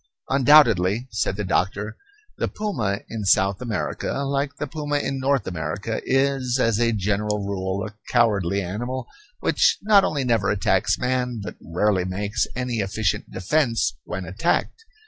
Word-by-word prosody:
Undoubtedly, 120 -6 +5
said 105 -2 -1
the 105 - -3
doctor, 100 +2 -1 0.4
the - - 0
puma 120 - -2
in 110 -2 -5
South 100 +1 +3
America, 115 -6 -3
like 140 +1 -1
the - - -3
puma 145 0 -2
in 135 -1 -2
North 135 0 +1
America, 95 +6 -3
is, 135 -2 +1
as 115 -3 +2
a 120 -1 +3
general 105 0 -1
rule, 95 0 -2
a 105 - -8 0.2
cowardly 100 -5 +2
animal 120 +8 -4 0.4
which - - +3
not 205 -2 +6
only 140 -3 0
never 115 -6 +1
attacks 100 -2 +2
man, 125 -1 -1
but 105 - -7
rarely 95 +3 +1
makes 100 +4 -1
any 125 -2 -2
efficient 100 -1 -1
defence 115 - +1
when 90 0 -5
attacked. 115 - -1
110 Hz, 145 wpm, -23 LUFS, 100-130 Hz, 0.4 s, not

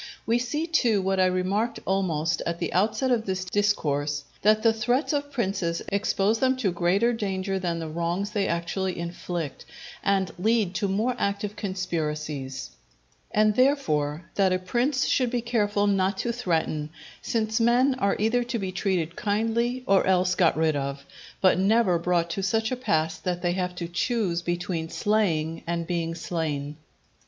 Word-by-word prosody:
We 230 +2 +2
see, 295 +6 -2
too, 245 -10 +2
what 190 0 +1
I 185 - +5
remarked 190 +6 0
almost 175 -4 0
at 170 0 -1
the 170 -2 -3
outset 215 +7 +1
of 230 -3 +1
this 185 -1 -2
Discourse, 150 -8 0 0.2
that 215 +1 +4
the 225 -1 +5
threats 245 +7 0
of 285 0 -2
princes 190 -9 -1
expose 200 +2 +1
them 260 0 +2
to 215 -8 0
greater 185 +7 +2
danger 195 -3 -2
than 175 -2 -1
the 165 -1 -4
wrongs 170 +5 -2
they 205 -2 0
actually 175 +2 -2
inflict, 170 -2 -5 0.4
and 195 -3 +1
lead 215 -2 +2
to 200 +2 0
more 220 +6 0
active 200 +1 -1
conspiracies: 150 - -3 0.6
and, 215 0 +3
therefore, 170 - +1
that 195 -2 +3
a 185 - +3
prince 245 +9 0
should 255 -2 +2
be 245 0 0
careful 205 -3 +1
not 195 -1 +1
to 240 - -1
threaten; 165 -9 -1 0.3
since 220 -1 0
men 245 +4 +4
are 200 -3 +2
either 225 +3 +2
to 235 0 -3
be 190 -3 -3
treated 180 -3 -1
kindly 230 +4 0
or 195 -1 +3
else 185 -1 +3
got 180 -4 +3
rid 160 -1 +2
of, 140 0 -3 0.4
but 185 -1 +4
never 195 -3 +3
brought 170 0 0
to 195 - -2
such 220 +4 0
a - - +1
pass 160 -9 0
that 180 -1 -3
they 175 - +2
have 180 0 -2
to 175 -1 -4
choose 175 -1 0
between 175 -1 -2
slaying 165 -8 0
and 170 0 -1
being 165 -1 -2
slain. 150 -4 -3
190 Hz, 165 wpm, -26 LUFS, 170-220 Hz, 0.6 s, I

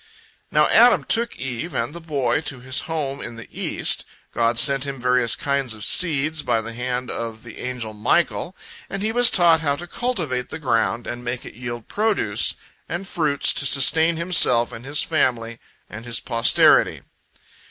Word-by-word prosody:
Now - - +2
Adam 240 +1 +5
took 235 +1 0
Eve 130 +6 -6
and 120 +4 -3
the 170 - -10
boy 140 -7 -1
to 135 - -4
his 130 +1 0
home 145 -4 -4
in 120 - -7
the 115 - -12
east. - - 0 0.3
God 115 0 0
sent 140 +1 +5
him 135 -1 -6
various 125 -1 +2
kinds 140 -5 -2
of 105 - -4
seeds 155 -3 +3
by 115 - -1
the 115 +1 -7
hand 125 +1 -4
of 115 -1 -6
the 115 - -12
angel 125 -3 -6
Michael, 170 - -1 0.3
and 195 +1 -5
he 220 - 0
was 245 +1 +6
taught 170 -3 +3
how 145 -3 0
to 175 - -9
cultivate 170 - -3
the - - -7
ground 120 -5 -1
and 120 0 -7
make 120 +1 -5
it - - -11
yield 120 -1 -8
produce 205 - 0 0.3
and 175 +4 -5
fruits, 155 -7 +1
to 140 - 0
sustain 160 +5 +4
himself 140 -9 +4
and 120 +1 -11
his 145 +2 0
family 120 -7 -2 0.3
and 110 +3 -11
his 120 -1 -2
posterity. 115 0 +2
130 Hz, 175 wpm, -21 LUFS, 120-160 Hz, 0.3 s, was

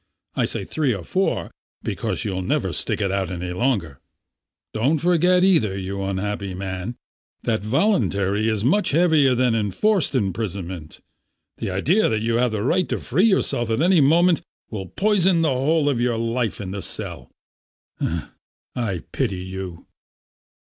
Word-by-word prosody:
I - - +1
say - - -3
three 140 -7 0
or 95 - -7
four, 190 - -1 0.3
because - - -2
you'll 95 -2 -2
never 90 - -1
stick - - -1
it 100 -2 0
out 95 -2 -1
any 90 0 -4
longer. 90 - -1 0.7
Don't 130 +9 +2
forget 180 +2 +3
either, 120 - +3
you 100 +1 -4
unhappy 100 0 -3
man, 95 +4 -4 0.5
that 110 -2 0
voluntary 110 - +1
is 110 -2 -1
much 200 - +3
heavier 155 -6 +4
than 125 -1 +2
enforced 135 - +1
imprisonment. 95 -6 -3 0.6
The - - -3
idea 145 - +2
that 110 -1 -1
you 115 0 +1
have 125 +1 +3
the 110 -2 -2
right 175 +8 +1
to - - -1
free 170 - +1
yourself 155 - +1
at 115 - +1
any 175 +1 +4
moment 165 +4 +4 0.3
will 95 -4 -5
poison 190 - +2
the 160 - +3
whole 145 +4 +2
of 130 -5 +1
your 120 -2 +1
life 115 -1 -1
in 95 -2 -5
the 100 0 -4
cell. - - -6 1.5
I 105 -9 -2
pity 90 -2 -1
you." 95 -2 -7
115 Hz, 155 wpm, -22 LUFS, 95-160 Hz, 1.5 s, heavier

